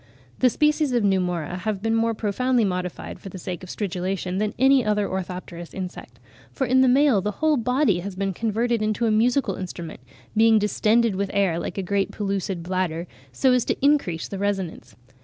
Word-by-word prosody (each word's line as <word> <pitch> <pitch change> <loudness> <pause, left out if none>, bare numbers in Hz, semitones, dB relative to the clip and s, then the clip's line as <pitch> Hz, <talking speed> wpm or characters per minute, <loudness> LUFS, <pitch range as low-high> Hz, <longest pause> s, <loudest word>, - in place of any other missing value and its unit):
The 255 - +5
species 300 +1 +1
of 240 -3 +2
Pneumora 180 -3 0
have 205 +1 -3
been 225 0 +1
more 225 0 +1
profoundly 235 +3 +1
modified 180 -2 -4
for 195 - -9
the 190 - -8
sake 180 -1 -5
of 185 - -10
stridulation 185 -1 -3
than 210 0 -1
any 265 +1 +5
other 210 -1 +1
orthopterous 180 -2 -6
insect; 180 -10 -7 0.3
for 265 - -1
in 260 +1 +4
the 260 - +5
male 260 -4 +4
the 210 +2 -2
whole 315 +6 +2
body 250 -5 +2
has 190 +1 -6
been 195 0 -2
converted 230 +3 0
into 215 +2 0
a 225 - +2
musical 245 +5 +2
instrument, 175 -3 -7 0.4
being 225 0 +5
distended 215 +1 +2
with 195 0 -1
air, 190 -4 +2
like - - -5
a 195 - -1
great 200 +2 0
pellucid 195 -3 -3
bladder, 175 -2 -2 0.3
so 260 -2 +3
as 250 -2 +3
to - - -1
increase 275 - +2
the 195 - -6
resonance. 190 - -3
200 Hz, 190 wpm, -24 LUFS, 185-235 Hz, 0.4 s, The